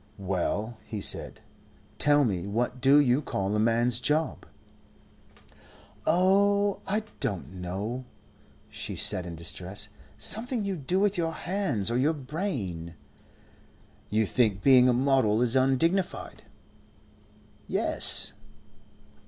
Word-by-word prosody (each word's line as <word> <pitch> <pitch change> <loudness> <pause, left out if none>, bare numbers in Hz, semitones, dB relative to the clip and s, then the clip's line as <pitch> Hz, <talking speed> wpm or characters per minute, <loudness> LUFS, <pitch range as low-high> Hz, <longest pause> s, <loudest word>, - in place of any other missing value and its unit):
"Well," 100 +4 -2
he 110 - -6
said. - - -2 0.6
"Tell 145 -1 +4
me, 95 -4 -2
what 120 +4 -2
do 135 +2 +6
you 135 -1 +3
call 100 -7 -2
a - - +1
man's 115 +2 +2
job?" 155 +4 -1 1.6
"Oh, 200 +2 +3
I 210 +2 -1 0.2
don't 100 - -3
know," 105 +8 -4 0.6
she - - -5
said 90 -1 +3
in 85 - -7
distress; 90 +4 -6 0.3
"something 225 - -2
you 195 -1 -2
do 175 +4 -1
with 205 -1 +1
your 165 -1 -1
hands 165 - -2
or 120 - +1
your 150 +5 +2
brain." 130 - -5 1.1
"You 110 +1 +1
think 105 -3 +1
being 130 -2 +6
a - - +3
model 130 -4 +2
is 125 +1 +2
undignified." 165 +8 0 1.2
"Yes." - - +3
125 Hz, 115 wpm, -27 LUFS, 105-165 Hz, 1.6 s, do